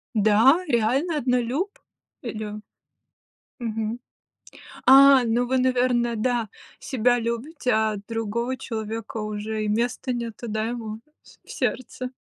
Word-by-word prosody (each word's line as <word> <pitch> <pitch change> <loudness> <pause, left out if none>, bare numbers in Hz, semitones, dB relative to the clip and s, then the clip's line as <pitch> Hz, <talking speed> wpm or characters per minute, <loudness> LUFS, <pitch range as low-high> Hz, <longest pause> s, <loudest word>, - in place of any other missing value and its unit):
Да, 220 - +5
реально 260 +9 +1
однолюб? 255 - -1 0.4
И - - -5
лю 215 -1 -6 1.0
Мгм, 225 0 -3 0.9
а, 270 -1 +8
ну 235 +2 +1
вы, 260 +1 +2
наверно, 250 -2 +2
да, 235 0 0 0.3
себя 245 -1 +1
любите, 245 +4 -2
а 220 -1 +1
другого 230 +3 -2
человека 225 -2 -5
уже 215 0 -3
и - - -2
места 245 +4 -1
нету, 235 -1 -5
да, 215 0 -1
ему 225 -2 -5 0.2
в - - -22
с - - -19
в - - -16
сердце. 250 +1 -3
235 Hz, 125 wpm, -24 LUFS, 220-255 Hz, 1.0 s, а